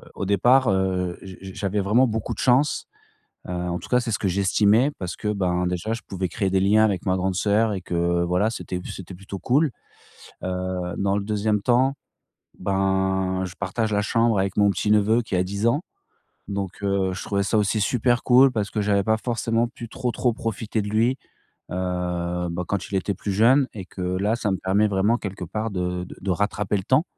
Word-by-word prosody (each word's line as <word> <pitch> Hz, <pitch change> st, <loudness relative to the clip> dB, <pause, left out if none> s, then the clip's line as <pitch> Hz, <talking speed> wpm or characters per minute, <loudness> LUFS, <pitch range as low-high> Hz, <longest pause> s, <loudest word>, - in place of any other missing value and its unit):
au -, -, -3 dB
départ, 120 Hz, +6 st, +4 dB
heu, 95 Hz, -2 st, 0 dB
je 95 Hz, -1 st, -9 dB
je 95 Hz, -1 st, -8 dB
j'avais 100 Hz, +1 st, -2 dB
vraiment 115 Hz, +7 st, +3 dB
beaucoup 110 Hz, -1 st, -2 dB
de -, -, -10 dB
chance, 135 Hz, +4 st, +2 dB, 0.6 s
heu, -, -, -3 dB
en 90 Hz, 0 st, -2 dB
tout -, -, -11 dB
cas, 125 Hz, -, +3 dB
c'est 120 Hz, -2 st, -3 dB
ce -, -, 0 dB
que 100 Hz, -, 0 dB
j'estimais 100 Hz, +7 st, +3 dB
parce 90 Hz, -2 st, -5 dB
que, 105 Hz, -, -4 dB
ben, 90 Hz, -3 st, 0 dB
déjà 90 Hz, +5 st, -2 dB
je 115 Hz, -, -7 dB
pouvais 95 Hz, -1 st, -3 dB
créer 100 Hz, +1 st, -1 dB
des 95 Hz, 0 st, +2 dB
liens 105 Hz, +3 st, +4 dB
avec 100 Hz, -4 st, 0 dB
ma 95 Hz, -, +2 dB
grande 95 Hz, 0 st, -1 dB
sœur 105 Hz, +3 st, +2 dB
et 95 Hz, -, -3 dB
que, 85 Hz, -1 st, 0 dB
voilà, 90 Hz, +5 st, +1 dB
c'était 90 Hz, -5 st, -5 dB
p -, -, -9 dB
c'était 95 Hz, 0 st, -8 dB
plutôt 100 Hz, +1 st, -8 dB
cool. 140 Hz, -, +2 dB, 0.7 s
Heu, 90 Hz, -1 st, -3 dB
dans 100 Hz, 0 st, +1 dB
le 100 Hz, -, -2 dB
2e 105 Hz, 0 st, 0 dB
temps, 130 Hz, +4 st, +3 dB, 0.7 s
ben, 95 Hz, -1 st, 0 dB
je 90 Hz, -, -7 dB
partage 110 Hz, +3 st, -2 dB
la 105 Hz, -, +2 dB
chambre 115 Hz, 0 st, +2 dB
avec 95 Hz, 0 st, -1 dB
mon 100 Hz, -1 st, +5 dB
petit 105 Hz, +1 st, -1 dB
neveu 105 Hz, +3 st, +4 dB
qui 110 Hz, -5 st, -4 dB
a 90 Hz, -, +2 dB
10 100 Hz, +4 st, -1 dB
ans. 145 Hz, +7 st, +2 dB, 0.7 s
Donc, 100 Hz, 0 st, -5 dB
heu, 100 Hz, -1 st, +1 dB
je 95 Hz, -, -6 dB
trouvais 100 Hz, -1 st, 0 dB
ça 110 Hz, -, +1 dB
aussi 105 Hz, +1 st, +1 dB
super 120 Hz, +3 st, +2 dB
cool, 130 Hz, +2 st, +6 dB
parce 110 Hz, -4 st, -2 dB
que 110 Hz, -, -3 dB
j'avais 100 Hz, -1 st, +2 dB
pas 110 Hz, +2 st, +2 dB
forcément 115 Hz, 0 st, 0 dB
pu 120 Hz, -1 st, -10 dB
trop, 125 Hz, +1 st, -2 dB
trop 120 Hz, +2 st, +1 dB
profiter 110 Hz, -1 st, -3 dB
de 105 Hz, -, -4 dB
lui, 115 Hz, +5 st, +2 dB, 0.5 s
heu, 90 Hz, -1 st, -2 dB
bah, 85 Hz, +1 st, -3 dB
quand 100 Hz, -3 st, -2 dB
il -, -, -5 dB
était 95 Hz, +2 st, 0 dB
plus 100 Hz, +1 st, -4 dB
jeune 125 Hz, +7 st, +4 dB
et 100 Hz, -3 st, -6 dB
que 95 Hz, -, -11 dB
là, 95 Hz, +5 st, 0 dB
ça 105 Hz, -3 st, -1 dB
me 95 Hz, -, +1 dB
permet 100 Hz, +3 st, +2 dB
vraiment, 105 Hz, +4 st, +2 dB
quelque 95 Hz, -4 st, -5 dB
part, 105 Hz, +6 st, -3 dB
de 90 Hz, -2 st, -2 dB
de -, -, -11 dB
de 95 Hz, -, -3 dB
rattraper 105 Hz, +2 st, 0 dB
le 95 Hz, -, -6 dB
temps 130 Hz, -, +3 dB
100 Hz, 215 wpm, -24 LUFS, 95-110 Hz, 0.7 s, cool